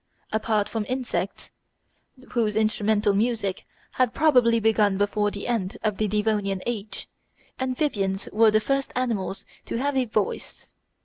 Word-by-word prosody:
Apart 215 -1 +1
from 220 0 -2
insects, 255 -1 -3 0.8
whose 220 -4 +1
instrumental 215 -1 +2
music 210 -2 -1 0.2
had 250 -2 +1
probably 250 -7 +4
begun 210 -3 +3
before 205 +1 +1
the 200 0 -6
end 220 -6 -1
of 215 -3 0
the 215 - +1
Devonian 205 -2 0
age, 220 -3 -4 0.5
amphibians 250 -8 -1
were 220 +1 +6
the 215 0 +4
first 275 +4 -1
animals 205 -6 -2 0.2
to - - -3
have 280 +3 0
a 260 -1 +2
voice. 215 -3 -3
215 Hz, 135 wpm, -25 LUFS, 205-240 Hz, 0.8 s, were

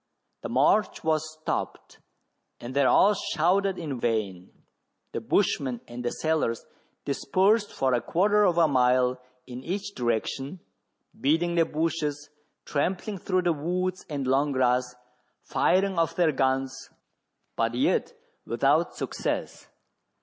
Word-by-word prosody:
The - - -5
march 215 -1 +2
was 155 -1 0
stopped, 155 0 -5 0.6
and 120 +2 -7
they 140 -1 +3
all 205 +9 +5
shouted 190 +1 +1
in 145 -7 -4
vain. 100 -6 -2 0.6
The - - -4
bushman 130 -4 0
and 120 +1 -7
the 120 - 0
sailors 155 -8 -1 0.4
dispersed 195 +10 +2
for 130 -1 0
a 120 - +2
quarter 205 - +2
of 180 -4 +2
a 165 -2 +5
mile 125 -2 +2 0.2
in 125 +1 -8
each 200 +3 -4
direction, 130 - -2 0.6
beating 165 +5 +1
the 170 -1 +3
bushes, 150 -2 -2 0.3
trampling 185 +6 -2
through 185 0 0
the 175 -1 +2
woods 180 +4 -2
and 140 -3 -3
long 140 +3 +2
grass, 125 -1 +1 0.5
firing 190 0 +1
ofif 165 -2 +1
their 170 -3 +3
guns, 135 -1 -1 0.7
but 115 +1 0
yet 125 - +1 0.3
without - - +1
success. - - -4
150 Hz, 130 wpm, -26 LUFS, 130-180 Hz, 0.7 s, all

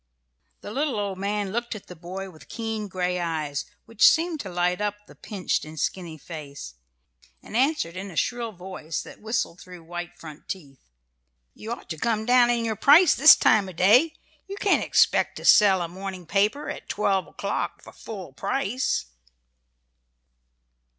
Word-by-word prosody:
The - - -8
little 270 -2 -1
old 200 -2 -3
man 200 0 -2
looked 235 +1 -3
at 210 - -10
the 180 - -11
boy 185 +3 -7
with 155 - -16
keen 225 -2 -4
gray 180 -1 -2
eyes, 155 -4 -2 0.2
which 230 -1 +6
seemed 330 -1 0
to 195 - -6
light 180 +2 0
up 210 0 -1
the - - -16
pinched 195 -4 -3
and 155 0 -9
skinny 170 +1 -3
face, 145 - -9 0.7
and - - -10
answered 260 - +1
in 195 +2 -6
a 175 - -11
shrill 235 +5 -1
voice 180 -4 -6
that - - -13
whistled 220 -5 -2
through 180 -2 -12
white 175 +1 -7
front 155 -3 -12
teeth: 140 - -8 0.6
"You 220 - -8
ought 235 - -6
to 160 -4 -5
come 220 +1 0
down 245 0 +5
in 235 -1 +1
your 220 -1 -1
price 300 - +6
this 310 +3 +9
time 205 -3 +3
of 185 - -11
day. 245 - +5 0.3
You 395 +1 -7
can't 400 0 +2
expect - - +2
to - - -8
sell 195 -4 +6
a - - -3
morning 185 +1 -7
paper 205 - +1
at - - -7
twelve 195 -2 0
o'clock - - -4
for - - -13
full 190 -10 -9
price." 215 - -1
195 Hz, 170 wpm, -25 LUFS, 175-230 Hz, 0.7 s, this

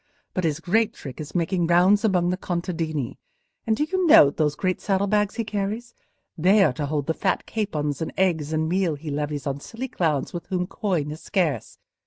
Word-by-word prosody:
But 185 - -1
his 155 -1 0
great 210 +6 +1
trick 135 +1 -8
is 150 - -9
making 175 0 +1
rounds 185 +5 +4
among 180 -5 +2
the - - 0
contadini. 165 -7 -3 0.5
And 220 -1 +2
do 295 - +1
you 365 +3 0
note 145 - +7
those 150 -2 +1
great 185 +1 -1
saddle 195 -1 +1
bags 210 0 +1
he 230 - -1
carries? 215 +3 -3 0.4
They 190 +5 +5
are 150 - +3
to 145 +3 -3
hold 145 -1 -1
the 160 - 0
fat 190 +3 -1
capons 150 -10 -2
and 160 - -2
eggs 165 -5 +1
and 160 0 0
meal 180 -2 +1
he 150 +1 -7
levies 145 0 -3
on 140 -1 -2
silly 240 - -6
clowns 155 - -1
with 175 - -6
whom 180 -1 -1
coin 180 -8 -2
is 155 - -8
scarce. 160 - -1
175 Hz, 205 wpm, -24 LUFS, 150-200 Hz, 0.5 s, note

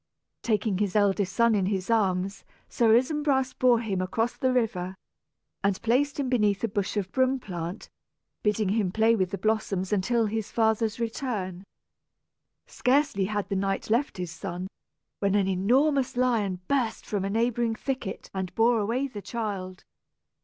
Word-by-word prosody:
Taking 215 -3 0
his 205 -2 -1
eldest 200 -2 +2
son 235 -1 +3
in 195 -3 +1
his 190 +1 -1
arms, 195 -3 +1 0.2
Sir 225 -2 +4
Isumbras 265 0 +1
bore 245 -2 +3
him 195 -5 -2
across 225 +6 -1
the 260 - +1
river, 195 -7 -1 0.7
and 200 -1 +1
placed 275 +6 +1
him 275 - 0
beneath 210 -5 +1
a - - +3
bush 200 0 -2
of 190 -2 -2
broom 260 0 +2
plant, 175 -2 -6 0.5
bidding 210 -1 +1
him 200 -3 +1
play 225 +3 +3
with 185 -4 0
the 200 - -4
blossoms 200 -2 -1
until 225 +4 +2
his 220 0 -3
father's 220 0 +1
return. 215 -6 -3 1.0
Scarcely 265 -6 +1
had 205 -1 -2
the 200 - -1
knight 195 +2 -1
left 240 0 +1
his 180 -2 -4
son, 180 +2 -5 0.5
when 200 0 +1
an 200 -2 +2
enormous 250 +9 +2
lion 215 -8 +1
burst 255 -5 0
from 205 -3 -2
a 195 - -1
neighboring 230 +1 +1
thicket 260 -6 -4
and 190 -2 -4
bore 230 +1 +4
away 230 +6 0
the 225 -7 -7
child. 195 -4 -5
215 Hz, 160 wpm, -27 LUFS, 195-240 Hz, 1.0 s, Sir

